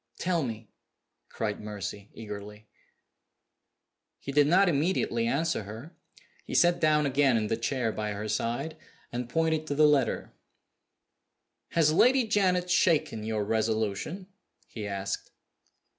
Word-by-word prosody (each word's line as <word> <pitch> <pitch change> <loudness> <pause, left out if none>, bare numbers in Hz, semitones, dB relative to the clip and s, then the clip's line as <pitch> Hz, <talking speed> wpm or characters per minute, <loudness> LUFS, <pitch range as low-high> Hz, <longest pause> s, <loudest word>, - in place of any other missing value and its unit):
"Tell 175 -2 0
me!" 115 -4 -5 0.6
cried 105 -2 -3
Mercy, 105 -1 -6
eagerly. 105 -1 -8 1.5
He 140 - -6
did 145 0 +4
not 190 +5 +5
immediately 145 -7 +1
answer 155 +3 0
her. 110 - -10 0.5
He - - -6
sat 175 0 +4
down 150 -1 +3
again 135 -2 +3
in 110 - 0
the - - +1
chair 115 0 -1
by 105 -1 -3
her 105 +1 -5
side, 120 +9 -2 0.3
and 120 0 -4
pointed 160 +2 0
to 145 - -2
the 155 +1 +5
letter. 140 -6 +1 1.4
"Has 155 -2 +4
Lady 250 +8 +4
Janet 185 -4 +1
shaken 155 -11 +2
your 110 -1 -1
resolution?" 110 - -1 0.4
he 105 -3 -6
asked. 100 -1 -4
125 Hz, 130 wpm, -28 LUFS, 110-160 Hz, 1.5 s, not